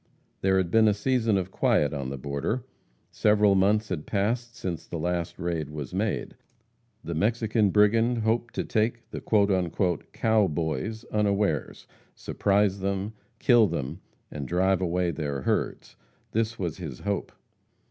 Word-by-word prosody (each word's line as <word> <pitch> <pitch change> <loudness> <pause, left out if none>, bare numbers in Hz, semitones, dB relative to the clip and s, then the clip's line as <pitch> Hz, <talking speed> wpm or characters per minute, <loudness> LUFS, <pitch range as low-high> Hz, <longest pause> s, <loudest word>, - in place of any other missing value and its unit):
There 95 0 +3
had 90 -3 0
been 110 -1 +5
a 105 - +3
season 115 -1 +1
of 95 0 -3
quiet 75 -4 +2
on 70 -3 -3
the 70 - -5
border. 70 - -2 0.5
Several 105 -1 +4
months 105 +3 +2
had 85 -5 -4
passed 115 +4 -1
since 95 -9 -5
the 85 - -5
last 85 +1 -2
raid 85 -5 -2
was 75 -3 -6
made. - - -2 0.7
The 85 - -4
Mexican 110 +3 +1
brigand 115 +4 +3
hoped 115 +1 0
to - - -1
take 115 +1 -1
the - - -5 0.9
"cow 110 -3 +3
boys" 80 - -3
unawares 100 -7 0 0.3
surprise 100 -1 +1
them 100 +2 -2 0.2
kill 120 -2 +5
them, 80 +1 -4 0.3
and 70 -3 -5
drive 95 +1 +2
away 90 0 0
their 70 -3 -3
herds. - - -2 0.4
This 115 +1 -1
was 85 -5 -3
his 80 -9 -7
hope. 100 -2 -2
100 Hz, 145 wpm, -27 LUFS, 85-110 Hz, 0.9 s, been